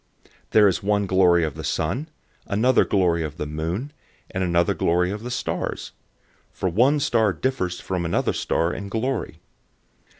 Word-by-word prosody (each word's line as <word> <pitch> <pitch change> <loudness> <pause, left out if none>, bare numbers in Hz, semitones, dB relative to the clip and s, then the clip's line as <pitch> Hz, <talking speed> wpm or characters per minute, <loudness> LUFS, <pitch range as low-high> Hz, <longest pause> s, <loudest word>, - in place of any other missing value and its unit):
015:041 - - -43
There 105 -1 +6
is 95 - 0
one 100 0 +1
glory 90 -2 +4
of 75 -3 -2
the - - -8
sun, 120 - -2 0.4
another 120 +5 +3
glory 90 -4 +2
of 75 0 -6
the - - -3
moon, 85 - -4 0.4
and 95 - -2
another 85 +1 +2
glory 90 +1 +1
of 105 +1 -5
the 120 - -6
stars; 120 - -3 0.6
for 95 - -2
one 125 - +3
star 115 -7 +2
differs 90 -3 -2
from 90 -2 -3
another 85 - 0
star 85 +1 0
in 100 -1 -6
glory. 125 +6 -3
95 Hz, 165 wpm, -23 LUFS, 85-115 Hz, 0.6 s, There